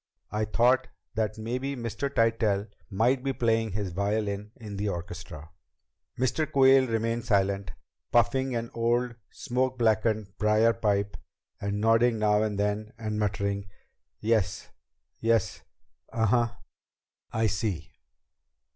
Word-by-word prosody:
I 105 0 0
thought 120 +4 +3 0.3
that 110 -2 -1
maybe 125 +5 -3
Mr. 120 +3 -3
Tytell 110 -4 +1 0.2
might 120 +6 +2
be 135 -1 0
playing 115 -4 +1
his 100 -2 -2
violin 100 +2 -1
in 105 -3 -8
the 105 +1 -1
orchestra." 85 -3 -7 0.7
Mr. 135 +5 0
Quayle 135 -1 +6
remained 115 0 -1
silent, 100 -3 +1 0.4
puffing 120 +2 +2
on 115 - -2
an - - -15
old 120 +1 +1 0.2
smoke 130 -1 -1
blackened 110 -3 +1
briar 110 +2 +4
pipe 100 -3 0 0.4
and 100 0 -2
nodding 115 +2 +4
now 105 -1 +3
and 105 -2 -1
then 105 +1 -1
and 110 -2 -3
muttering 100 -1 -1 0.5
"Yes.... 110 -2 0 0.5
Yes.... 115 -2 +1 0.5
Uh 110 -1 +1
huh.... 115 +1 +2 0.8
I 110 0 +1
see." 100 -6 -2
110 Hz, 125 wpm, -28 LUFS, 105-120 Hz, 0.8 s, Quayle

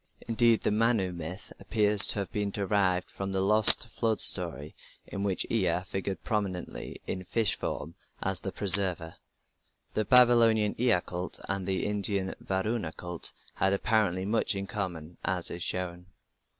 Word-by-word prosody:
Indeed, 115 0 +1
the - - 0
Manu 110 -3 0
myth 90 +3 -9
appears 105 -1 +4
to - - +3
have 100 -2 -4
been 105 -1 -3
derived 95 -2 -1
from 95 0 -6
the 95 - -1
lost 105 +3 +6
flood 110 -2 -2
story 75 +4 +4 0.3
in 100 - -7
which 100 -2 -1
Ea 95 -5 0
figured 95 0 -6
prominently 100 -5 -5
in 95 - -5
fish 105 +3 0
form 80 +2 -6 0.3
as 95 -1 -1
the 95 - -5
Preserver. 90 -4 +3 0.8
The 110 - -1
Babylonian 115 -3 +4
Ea 120 -7 +2
cult 90 +1 -6
and 95 -1 -4
the 95 -1 -2
Indian 100 -2 -1
Varuna 95 -2 -3
cult 90 -1 -1 0.2
had 95 0 0
apparently 100 -3 -1
much 110 0 0
in 100 0 -4
common, 90 -5 -7
as 90 -1 -2
is 85 - -7
shown. 90 0 -5
95 Hz, 150 wpm, -27 LUFS, 90-105 Hz, 0.8 s, lost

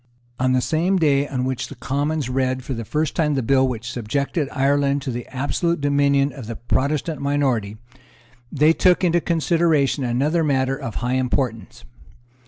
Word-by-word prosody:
On 130 0 +2
the 130 - +2
same 170 +8 +1
day 145 -4 +2
on 130 -2 -2
which 130 0 -3
the 145 - -10
Commons 145 +3 -2
read 130 0 -1
for 135 - -4
the 115 -1 -4
first 150 +6 -2
time 150 -3 +1
the 135 - -1
bill 130 +2 +3
which 120 -2 -4
subjected 140 - -2
Ireland 140 0 +1
to 135 - -3
the 120 0 -6
absolute 150 +6 -1
dominion 140 -1 +2
of 125 -4 -9
the 115 - -5
Protestant 140 +5 -1
minority, 130 -8 0 0.7
they 150 +3 +4
took 180 +2 +3
into 175 -1 +3
consideration 160 -4 +1
another 140 +7 +1
matter 135 -3 +1
of 135 -5 -6
high 125 - 0
importance. 120 - -3
140 Hz, 170 wpm, -21 LUFS, 130-150 Hz, 0.7 s, they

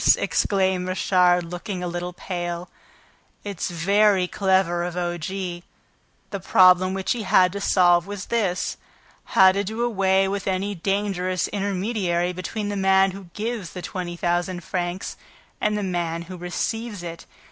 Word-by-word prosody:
exclaimed 190 -2 +1
Richard, 180 -1 +3
looking 180 +2 -5
a - - -2
little 175 +1 -4
pale. 175 -1 -5 0.7
"It's 200 -4 -4
very 195 +2 +3
clever 190 -3 +1
of 175 0 -4
O. 175 -1 -1
G. 175 0 -4 0.7
The 200 - -3
problem 185 0 +5
which 190 -1 -2
he 240 - 0
had 185 -2 +4
to 200 +1 -5
solve 175 -2 +4
was 205 -1 -6
this: 195 -6 0 0.6
how 190 0 +8
to 200 +2 -1
do 220 +4 -3
away 195 -4 +2
with 195 0 -3
any 195 +2 -1
dangerous 190 -1 -1
intermediary 195 -3 -1
between 205 +4 -4
the 205 - -2
man 190 0 +4
who 195 0 -9
gives 215 -4 -4
the 180 - -7
twenty 175 -2 -5
thousand 175 +1 -1
francs 175 +1 -3 0.4
and 210 0 +1
the 205 - -2
man 170 -3 -2
who 185 +2 -9
receives 205 +4 -3
it. 170 -1 -8
185 Hz, 150 wpm, -23 LUFS, 175-200 Hz, 0.7 s, how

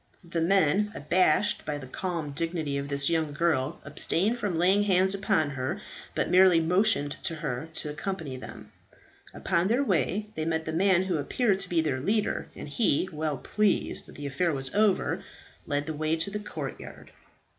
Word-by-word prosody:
The 170 0 -2
men, 195 +3 +3
abashed 185 +6 +2
by 150 - -3
the 140 - -8
calm 165 +2 -4
dignity 160 -1 -2
of 140 - -4
this 140 0 +2
young 160 -3 0
girl, 150 -2 0
abstained 215 +8 +1
from 205 -5 -1
laying 185 +5 +4
hands 190 -1 +3
upon 195 -7 +1
her, 130 -1 -3 0.4
but - - +1
merely 185 -2 +6
motioned 170 -3 +2
to 170 -3 -3
her 150 -1 -4
to 150 - -4
accompany 155 -3 -4
them. 130 - -10 0.6
Upon 170 +2 0
their 240 +6 +2
way 205 -2 0
they 155 - -3
met 160 0 -1
the 160 - -3
man 185 +1 +3
who 185 -3 -1
appeared 195 - +1
to 195 -2 -4
be 170 -2 +2
their 145 -5 -1
leader, 210 +10 0
and - - -8
he, 185 +1 +1
well 155 -2 -2
pleased 210 +8 +1
that - - -13
the 145 - -7
affair 155 +5 0
was 135 -3 -3
over, 210 -2 +2 0.4
led 145 0 -1
the 160 - -4
way 155 +1 0
to 165 +5 -3
the 210 - -3
courtyard. 210 - -8
165 Hz, 180 wpm, -28 LUFS, 150-195 Hz, 0.6 s, merely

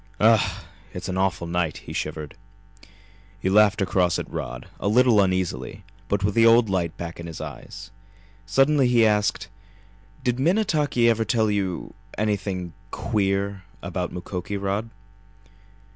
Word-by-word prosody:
"Ugh! 105 -3 +3 0.3
It's 90 +1 -5
an 95 - -2
awful 95 -3 0
night!" 85 -2 -1
he - - -7
shivered. 75 -1 -4 1.0
He 95 - 0
laughed 105 0 +5
across 90 -2 +2
at - - -4
Rod, - - -6
a - - -2
little 115 0 +5
uneasily, 95 -2 -1 0.2
but 100 0 0
with 100 0 +1
the 115 - +4
old 115 -2 +5
light 85 -4 -1
back 85 -1 -6
in 85 - -6
his 80 - -7
eyes. 100 +2 -8 0.6
Suddenly 135 +4 +4
he 120 -2 +4
asked: 105 -3 +1 0.8
"Did 125 -1 0
Minnetaki 150 - +2
ever 115 -1 +3
tell 110 0 +1
you 95 -4 -2 0.2
anything 100 -4 -2 0.2
queer 100 -2 -1 0.2
about 90 -2 -3
Mukoki, 90 +2 -5
Rod?" 100 +3 -2
100 Hz, 140 wpm, -24 LUFS, 90-115 Hz, 1.0 s, laughed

